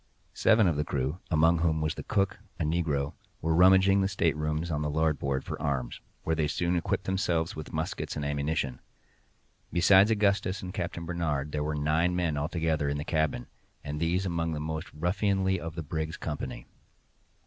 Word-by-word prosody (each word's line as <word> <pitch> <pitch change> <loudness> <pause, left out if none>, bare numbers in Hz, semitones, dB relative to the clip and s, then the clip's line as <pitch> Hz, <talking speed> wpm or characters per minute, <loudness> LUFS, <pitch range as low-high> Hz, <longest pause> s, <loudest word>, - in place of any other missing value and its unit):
Seven 110 -1 +4
of 85 -5 +2
the 75 - +1
crew 70 +4 -2
(among 80 +1 +4
whom 80 -1 +1
was 75 +1 0
the - - -7
cook, 100 -2 0 0.2
a - - +1
negro) 75 -3 0 0.3
were 80 0 0
rummaging 95 +3 +6
the 95 - +2
staterooms 80 -3 0
on 75 -1 -1
the 75 - -1
larboard 75 -3 0
for - - -6
arms, 65 -4 -2 0.2
where 80 - 0
they 80 -2 +1
soon 85 +3 0
equipped 85 +2 -1
themselves 90 -4 0
with 80 - -7
muskets 80 0 -3
and 75 - -3
ammunition. 70 -2 -1 0.9
Besides 95 +4 +6
Augustus 100 -2 +1
and 90 0 -6
Captain 85 - -4
Barnard, 75 -4 -2
there 75 0 -1
were 75 0 -2
nine 80 +4 +1
men 85 -4 0
altogether 80 0 0
in 70 - -1
the 75 - -3
cabin, 80 -6 0 0.4
and 75 0 -4
these 85 +4 +1
among 85 -2 -1
the 75 - -3
most 80 +2 -4
ruffianly 95 +3 0
of 80 -2 -6
the 85 - -4
brig's 80 +2 -3
company. 75 -2 -5
80 Hz, 180 wpm, -29 LUFS, 75-90 Hz, 0.9 s, rummaging